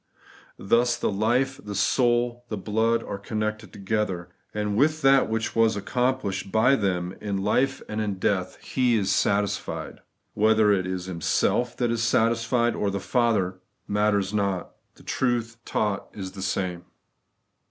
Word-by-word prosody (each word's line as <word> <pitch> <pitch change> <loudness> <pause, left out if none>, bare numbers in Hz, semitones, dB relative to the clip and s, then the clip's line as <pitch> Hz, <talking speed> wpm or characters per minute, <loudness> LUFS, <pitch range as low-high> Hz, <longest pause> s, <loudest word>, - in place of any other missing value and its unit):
Thus 120 +5 +2
the - - -1
life, 120 +6 0
the 105 -1 -6
soul, 120 +3 +1
the 105 - -3
blood, 110 +4 +1
are 100 - -5
connected 110 +1 -3
together; 95 -3 -2 0.2
and 105 -1 -2
with 155 +5 +2
that 135 -2 +5
which 115 0 -2
was 115 -1 +3
accomplished 105 -3 -1
by 125 +5 +4
them 90 -5 -1
in 100 -2 -2
life 130 +6 +1
and 110 +1 -3
in 105 -2 -1
death 95 -1 -1
He 125 -2 +1
is 100 -3 +1
satisfied. 100 +1 -1 0.3
Whether 110 0 +4
it 95 -2 +1
is 95 0 -4
Him 85 -3 -6
self 120 +9 +1
that 120 -2 +1
is 115 -1 -1
satisfied, 115 +1 +2
or 100 - 0
the 100 0 -2
Father, 100 -6 +1 0.3
matters 105 -1 +1
not. 100 -3 -1 0.2
The - - -18
truth 120 -3 -1
taught 105 -2 -1
is 95 -2 -6
the 95 - -9
same. 95 -2 -2
105 Hz, 155 wpm, -25 LUFS, 100-120 Hz, 0.3 s, that